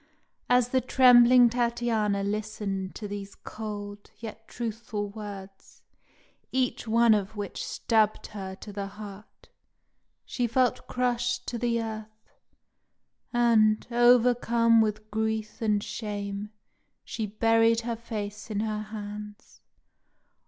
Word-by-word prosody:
As 245 -1 +4
the 260 0 +2
trembling 250 -1 +7
Tatiana 235 -4 0
listened 205 -2 -3
to 210 - -6
these 200 -1 -7
cold, 205 -1 -7
yet 225 0 -9
truthful 225 -3 -4
words, 200 -2 -10 0.7
each 255 -3 -1
one 230 0 +5
of 205 0 -1
which 205 -2 -5
stabbed 215 -2 +1
her 190 -2 -6
to 205 +1 -10
the 200 0 -4
heart, 205 0 -12 0.8
she 245 -2 -1
felt 250 +1 +1
crushed 245 0 -1
to 240 - -4
the 235 -1 0
earth; 220 -1 -7 1.0
and, 225 -3 +3
overcome 235 -1 +4
with 215 0 -2
grief 220 +1 -2
and 210 -2 +1
shame, 205 -1 -5 0.5
she 220 -2 -4
buried 225 +2 +3
her 235 0 -3
face 210 -3 -6
in 210 -1 -1
her 215 -1 -2
hands. 210 -1 -9
220 Hz, 115 wpm, -27 LUFS, 205-235 Hz, 1.0 s, trembling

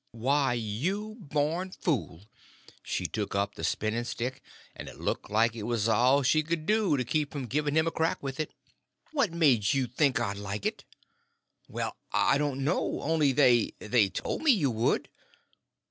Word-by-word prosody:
"Why, 135 +3 +1
you 170 - -3
born 165 +3 -2
fool!" 105 - -2 0.6
She - - -3
took 105 -2 -3
up 100 +1 0
the - - -9
spinning 110 +2 -1
stick, 125 +2 -4 0.3
and - - -8
it - - -13
looked - - -3
like 115 +2 +2
it 115 - -6
was 115 -2 +1
all 130 +5 +4
she 155 +4 +3
could 155 0 -3
do 210 -6 +2
to 125 - 0
keep 150 +3 -1
from 140 -4 -4
giving 145 +4 -1
him 160 0 +4
a 165 - 0
crack 160 0 0
with 135 0 -5
it. 155 - -2 0.6
"What 275 - +1
made 140 - +3
you 135 -2 +1
think 130 +1 +1
I'd 100 -4 -2
like 100 0 -5
it?" - - -2 0.8
"Well, - - -4
I 140 - +3
don't 140 -2 -1
know. 155 +7 -1
Only, 155 -2 +2
they—they—told 120 -5 +2
me 315 - +2
you 170 - +4
would." 115 +1 0
135 Hz, 170 wpm, -29 LUFS, 115-155 Hz, 0.8 s, all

